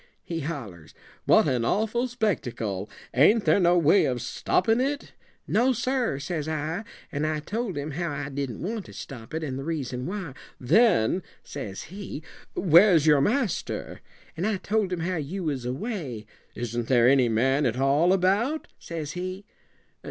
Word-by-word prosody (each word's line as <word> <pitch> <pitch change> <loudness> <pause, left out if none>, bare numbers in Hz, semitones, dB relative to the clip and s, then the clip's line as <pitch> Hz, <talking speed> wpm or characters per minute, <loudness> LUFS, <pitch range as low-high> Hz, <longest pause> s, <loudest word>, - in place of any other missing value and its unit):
he 165 -1 -4
hollers, 120 - -6 0.3
'what - - +5
an 125 -4 +1
awful 220 - +1
spectacle! 120 - -2 0.2
Ain't 205 - +5
there - - +4
no 175 -1 +4
way 170 +4 +5
of 125 -2 -1
stoppin' 205 - +1
it?' 285 +2 -2 0.3
'No, 250 +4 +3
sir,' 245 - 0
says 150 +1 -3
I, 160 +6 -3 0.3
and 150 +1 -1
I 155 -1 -1
told 205 +3 -3
him 145 +2 -3
how 170 +4 -2
I 145 0 -4
didn't 135 -3 -4
want 215 +2 -3
to - - -12
stop 120 -5 -9
it 160 - -2
and 135 -3 -3
the - - -5
reason 135 -5 -3
why. 185 -6 -5 0.3
'Then,' 180 - +3 0.2
says 105 -9 -6
he, 190 -4 -8 0.3
'where's 175 -2 +6
your 150 -3 +5
master?' 230 - -1 0.3
and 175 +6 -1
I 215 -2 0
told 205 0 0
him 180 -2 -2
how 180 +1 -1
you 165 +6 -4
was 140 -6 -2
away. 130 - -4 0.3
'Isn't 120 0 -3
there 120 -2 +5
any 130 -2 +5
man 135 +5 +2
at 120 +1 -2
all 140 +6 +3
about?' 200 - +1
says 160 -3 -5
he. 185 +3 -5
160 Hz, 165 wpm, -26 LUFS, 135-200 Hz, 0.3 s, where's